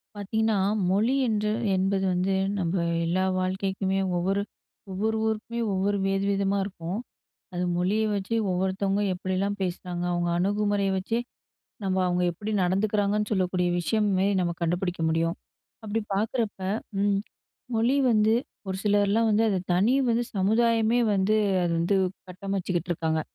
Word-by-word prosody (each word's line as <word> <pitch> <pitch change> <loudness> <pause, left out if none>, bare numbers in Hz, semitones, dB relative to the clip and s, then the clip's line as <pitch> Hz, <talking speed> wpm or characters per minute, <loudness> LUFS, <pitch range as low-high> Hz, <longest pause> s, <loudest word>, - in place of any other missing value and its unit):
பார்த்தீங்கன்னா, 220 +2 0 0.3
மொழி 220 +7 +2
என்று 210 -1 0 0.2
என்பது 190 +1 +1
வந்து 185 +2 +1 0.3
நம்ம 170 0 -1 0.3
எல்லா 185 +3 +1 0.2
வாழ்க்கைக்குமே 190 +1 -1 0.2
ஒவ்வொரு 195 +3 0 0.5
ஒவ்வொரு 215 +4 -1
ஊருக்குமே 220 +2 -3
ஒவ்வொரு 200 +2 +1
வேறு 195 0 0
விதமா 200 0 +1
இருக்கும். 185 0 -5 0.5
அது 180 0 -1
மொழிய 190 +5 +1
வச்சு 200 +3 -2 0.2
ஒவ்வொருத்தவங்க 190 +2 0
எப்படிலாம் 185 +2 -1
பேசுனாங்க. 180 -1 -3
அவங்க 175 0 0
அணுகுமுறைய 205 +1 +1
வச்சே 225 +5 -1 0.6
நம்ம 190 -1 0
அவங்க 180 0 +1
எப்படி 205 +5 -5
நடந்துக்கிறாங்கன்னு 205 +2 +1
சொல்லக்கூடிய 185 -2 +1
விஷயமே 195 +2 +1
நம்ம 175 -1 0
கண்டுபிடிக்க 175 +1 -1
முடியும். 165 +2 0 0.5
அப்படி 220 +1 -1
பார்க்குறப்ப 215 +1 -1 0.4
ம். 200 -1 +2 0.6
மொழி 235 +4 +2 0.2
வந்து, 215 0 +4 0.3
ஒரு 190 0 -2
சிலர்லாம் 205 +2 +3
வந்து, 215 +1 +3
அத 195 - +1 0.2
தனி 200 +8 +3 0.2
வந்து 235 +1 +2
சமுதாயமே 225 +3 +3
வந்து 195 +2 +2 0.3
அது 175 - 0
வந்து 175 +4 +2 0.3
கட்டமச்சிட்டுருக்காங்க! 180 -4 -2
195 Hz, 125 wpm, -26 LUFS, 185-210 Hz, 0.6 s, வந்து